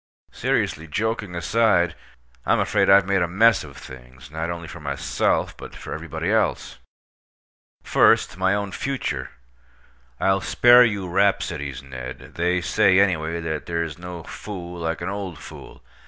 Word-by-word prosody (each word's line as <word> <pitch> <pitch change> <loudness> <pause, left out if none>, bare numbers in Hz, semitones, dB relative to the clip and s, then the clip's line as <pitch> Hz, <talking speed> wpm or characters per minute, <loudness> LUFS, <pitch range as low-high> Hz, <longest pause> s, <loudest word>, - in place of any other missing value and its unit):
Seriously, 80 +3 -1
joking 105 +2 -2
aside, 90 0 +2 0.5
I'm - - +2
afraid - - +2
I've 100 0 +7
made 100 -1 +1
a 85 - +1
mess 115 +7 +4
of 70 -2 -12
things, 65 0 -13
not 80 +2 -3
only 85 -1 -5
for 85 - -9
myself, 70 -2 -1
but - - -11
for - - -7
everybody 80 +3 -4
else. 110 -1 0 1.0
First, - - +3
my 95 +2 +1
own 100 -1 -3
future. 80 - -3 0.9
I'll 95 0 +2
spare 120 +1 +6
you 100 -5 -1
rhapsodies, 85 -8 0
Ned. 65 -1 -9
They 90 +1 0
say, 95 +2 +3
anyway, 85 -4 +1
that 80 -2 -4
there's 85 -2 -3
no 90 -1 -8
fool 90 -3 -8
like 80 0 -3
an 85 - -3
old 100 -4 -5
fool. - - -12
85 Hz, 145 wpm, -23 LUFS, 80-100 Hz, 1.0 s, I've